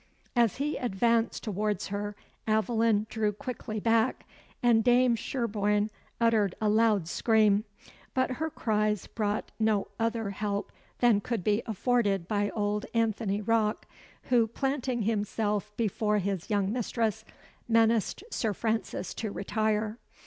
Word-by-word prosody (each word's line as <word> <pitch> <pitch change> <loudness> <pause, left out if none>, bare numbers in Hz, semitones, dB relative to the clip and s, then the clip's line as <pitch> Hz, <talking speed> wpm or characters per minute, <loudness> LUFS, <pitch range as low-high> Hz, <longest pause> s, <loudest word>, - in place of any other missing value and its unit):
As 235 -4 +3
he 295 +3 -1
advanced 230 0 +1
towards 210 -2 -2
her, 205 +1 -3 0.3
Aveline 220 -1 +2
drew 215 -1 0
quickly 215 0 -5
back, 225 +1 +1 0.4
and 230 -2 +5
Dame 245 0 +4
Sherborne 210 -3 0 0.3
uttered 220 -5 +2
a 215 - +1
loud 215 -5 +3
scream; 215 +1 +3 0.5
but 260 0 +1
her 320 - 0
cries 215 - 0
brought 210 -1 -2
no 215 -2 +1
other 225 -2 -1
help 200 0 -3 0.3
than 235 -4 +5
could 230 -3 -3
be 210 +3 +2
afforded 205 -4 +1
by 205 0 0
old 210 -1 -1
Anthony 220 -2 0
Rocke, 215 0 +1 0.4
who, 235 -3 +3
planting 260 -1 -1
himself 210 -1 -1
before 210 -1 +1
his 195 -3 -2
young 200 -2 +1
mistress, 225 -2 -1 0.4
menaced 230 - +2
Sir 220 -3 0
Francis 220 -2 -2
to 220 - -4
retire. 215 +2 -1
215 Hz, 125 wpm, -29 LUFS, 205-230 Hz, 0.5 s, and